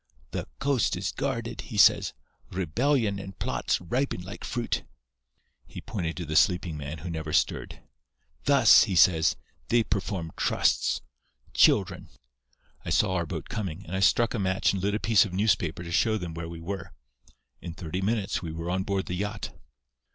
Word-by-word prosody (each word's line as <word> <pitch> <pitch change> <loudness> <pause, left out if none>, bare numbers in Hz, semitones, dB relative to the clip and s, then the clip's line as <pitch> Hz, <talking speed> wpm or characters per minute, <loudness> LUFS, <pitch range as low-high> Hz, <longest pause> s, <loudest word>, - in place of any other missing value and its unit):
'The - - -4
coast 135 -5 +1
is - - -2
guarded,' - - -3
he - - -8
says. - - +5 0.4
'Rebellion 100 - 0
and 95 -1 -9
plots - - -1
ripen 125 +7 -1
like 95 +3 -9
fruit.' 120 -2 -2 0.9
He - - -9
pointed 85 -6 -4
to 90 - -4
the 75 0 -4
sleeping 90 -1 +3
man, 75 +2 -6
who 85 +4 -7
never 80 -2 -4
stirred. 75 - -1 0.6
'Thus,' 140 -6 +7
he 100 -4 -2
says, 85 -2 +5 0.3
'they 115 +5 +3
perform 95 -5 -3
trusts. - - +1 0.5
Children!' - - +3 0.7
"I - - -5
saw 95 -3 +2
our 85 -2 -1
boat - - -5
coming, 95 -3 -5
and 90 - -5
I - - 0
struck 115 +4 +3
a 115 - -2
match 95 0 +1
and 95 - -2
lit 100 +2 0
a - - -1
piece 110 -4 +4
of 100 - -6
newspaper 90 -4 +1
to 85 - -7
show 110 +5 +2
them 90 -5 -5
where 85 0 -6
we 85 0 -8
were. 95 +2 -6 0.7
In 85 -2 -7
thirty 90 +1 -4
minutes 105 0 -1
we 85 -3 -5
were 85 +2 -4
on 95 +1 0
board 95 0 -1
the - - -4
yacht. 105 +3 -3
95 Hz, 175 wpm, -27 LUFS, 85-105 Hz, 0.9 s, Thus